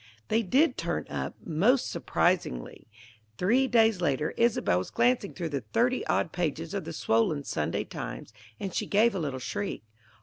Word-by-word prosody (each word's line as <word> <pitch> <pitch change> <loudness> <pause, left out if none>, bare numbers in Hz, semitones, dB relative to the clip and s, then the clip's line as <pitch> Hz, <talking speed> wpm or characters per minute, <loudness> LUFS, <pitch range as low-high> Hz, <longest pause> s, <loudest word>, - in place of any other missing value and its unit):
They 225 - +3
did 270 - +2
turn - - -2
up, - - -3
most 215 - +2
surprisingly. 170 - -1 0.5
Three 245 +9 +3
days 225 -6 +3
later, 150 -1 0
Isobel 230 - +2
was 95 - -5
glancing 235 -3 +2
through 170 -3 -3
the 140 -3 -2
thirty 240 - +1
odd 165 - +1
pages 165 -1 -2
of 200 -4 -3
the 165 - -5
swollen 140 +3 +1
Sunday 75 - -2
Times, - - -7 0.3
and 195 -2 -4
she - - -1
gave 220 +3 +4
a 190 - -2
little 140 -5 -2
shriek. 195 - -4
180 Hz, 165 wpm, -28 LUFS, 150-230 Hz, 0.5 s, gave